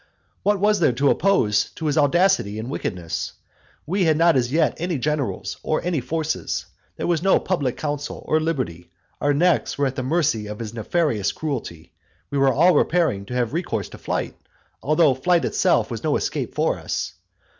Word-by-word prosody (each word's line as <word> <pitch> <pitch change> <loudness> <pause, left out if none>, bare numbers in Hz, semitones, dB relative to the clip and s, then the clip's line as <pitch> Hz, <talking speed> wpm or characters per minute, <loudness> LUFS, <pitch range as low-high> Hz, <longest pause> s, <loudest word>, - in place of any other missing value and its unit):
What 205 0 +2
was 210 +1 +3
there 155 -7 +3
to 140 +3 +3
oppose 115 - +2
to 160 - -6
his 150 -2 +1
audacity 155 - +3
and 115 +4 -5
wickedness? 90 - -4 0.5
We 185 +3 +1
had 155 -2 +3
not 165 0 +4
as 125 -1 +1
yet 160 +1 +2
any 175 -1 -1
generals, 120 -9 -2
or 155 - 0
any 170 -6 0
forces. 155 +5 -2 0.3
There - - -3
was 170 -3 +1
no 195 +1 +4
public 145 -10 -1
council, 145 -1 -4
no 155 - +3
liberty; 130 - -2 0.3
our 145 - +2
necks 170 +3 +2
were 140 - +1
at 130 -1 -2
the 130 - -2
mercy 130 -6 0
of 105 0 -6
his 110 -1 -6
nefarious 115 - 0
cruelty; 120 - -5 0.4
we 140 - 0
were 135 0 +4
all 170 +8 +5
preparing 150 - +1
to 125 - -5
have 120 0 0
recourse 115 - -2
to - - -12
flight, - - -3 0.5
though 155 0 +3
flight 165 +3 +2
itself - - +2
had - - -5
no - - +1
escape - - -2
for - - +1
us. - - -3
145 Hz, 185 wpm, -23 LUFS, 120-170 Hz, 0.5 s, all